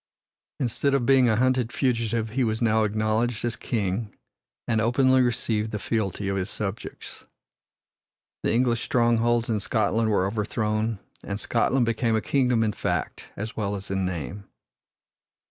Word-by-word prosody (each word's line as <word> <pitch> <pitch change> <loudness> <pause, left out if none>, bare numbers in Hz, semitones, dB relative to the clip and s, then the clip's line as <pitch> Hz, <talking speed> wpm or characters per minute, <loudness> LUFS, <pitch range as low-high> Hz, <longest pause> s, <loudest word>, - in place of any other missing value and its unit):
Instead 135 +2 +1
of 130 -3 +1
being 130 -2 +5
a 110 - +3
hunted 125 0 +1
fugitive 115 -4 0
he 130 +3 +1
was 110 -1 0
now 110 -2 +3
acknowledged 110 +2 0
as 120 - -1
king 105 -1 -2 0.6
and 110 -1 +2
openly 130 +3 +4
received 115 -3 0
the 105 - -3
fealty 105 -2 -2
of 100 - 0
his 95 +1 -2
subjects. 105 0 -6 1.2
The - - 0
English 120 -1 +2
strongholds 120 -1 +2
in 110 -2 0
Scotland 110 +2 +1
were 100 -3 +2
overthrown, 110 +1 -1 0.3
and 100 0 -4
Scotland 120 +2 +1
became 115 0 +1
a - - +3
kingdom 125 -2 +2
in 105 -1 0
fact - - -3
as 110 +4 -5
well 100 -2 -2
as 100 0 -6
in 95 0 0
name. 90 +2 -4
110 Hz, 150 wpm, -25 LUFS, 105-120 Hz, 1.2 s, being